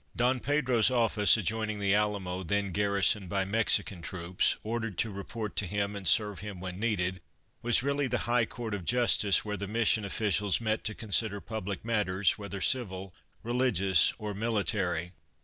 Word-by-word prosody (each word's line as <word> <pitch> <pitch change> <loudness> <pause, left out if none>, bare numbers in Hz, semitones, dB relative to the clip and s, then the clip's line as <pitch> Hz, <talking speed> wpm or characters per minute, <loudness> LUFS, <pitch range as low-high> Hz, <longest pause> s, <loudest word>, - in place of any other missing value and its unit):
Don 125 +2 +2
Pedro's 130 -3 +2
office, 115 -4 +3
adjoining 110 +1 -1
the 100 -1 +1
Alamo, 100 -3 -1
then 100 +2 -1
garrisoned 100 0 +1
by 95 +1 0
Mexican 100 -3 0
troops 90 +1 -1
ordered 110 -3 -4
to 110 +3 -1
report 105 +2 -6
to 100 - +1
him 100 +1 -2
and 100 -3 -2
serve 105 +2 +3
him 105 -3 -8
when 90 0 -7
needed, 95 -5 -1 0.4
was 120 0 +3
really 140 0 0
the 120 -1 -2
High 120 -1 +2
Court 115 -3 -6
of 100 -3 -4
Justice 115 -3 +3
where 105 -1 -3
the 100 +1 -5
Mission 110 0 +1
officials 100 0 0
met 110 -1 -2
to 110 0 -2
consider 105 -1 +1
public 105 -2 -6
matters, 100 -5 +1
whether 100 -2 -7
civil, 95 -7 0 0.3
religious 110 -8 +3
or 105 -1 -5
military. 100 -5 -1
105 Hz, 165 wpm, -29 LUFS, 95-115 Hz, 0.4 s, office